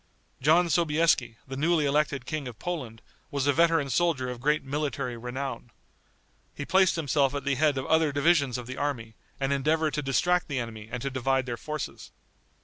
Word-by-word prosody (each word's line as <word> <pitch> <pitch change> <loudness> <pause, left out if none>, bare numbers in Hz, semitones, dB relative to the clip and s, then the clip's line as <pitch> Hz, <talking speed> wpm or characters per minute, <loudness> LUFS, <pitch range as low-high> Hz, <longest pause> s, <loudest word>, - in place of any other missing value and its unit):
John 160 +6 +4
Sobieski, 160 -7 +2
the 135 - -6
newly 155 +2 +2
elected 140 -2 0
King 150 -2 -4
of 120 -3 -8
Poland, 130 -11 -5 0.3
was 140 -1 -1
a 145 - +3
veteran 165 -3 +3
soldier 145 -7 +1
of 125 - -7
great 150 +3 +1
military 140 -2 -3
renown. 125 +1 -5 0.9
He 145 - -5
placed 185 +3 +4
himself 145 -3 +1
at 140 - -3
the 140 - +1
head 145 +1 +2
of 130 - -2
other 160 -1 +3
divisions 140 -3 +2
of 125 - -7
the 130 +2 -7
army, 125 -6 -3 0.3
and 135 0 0
endeavored 155 +3 +1
to 150 - -1
distract 175 +6 +1
the 140 - -3
enemy 110 -3 -5
and 125 0 -4
to 140 - -2
divide 130 0 0
their 120 -2 -3
forces. 150 +4 -6
140 Hz, 185 wpm, -27 LUFS, 130-155 Hz, 0.9 s, John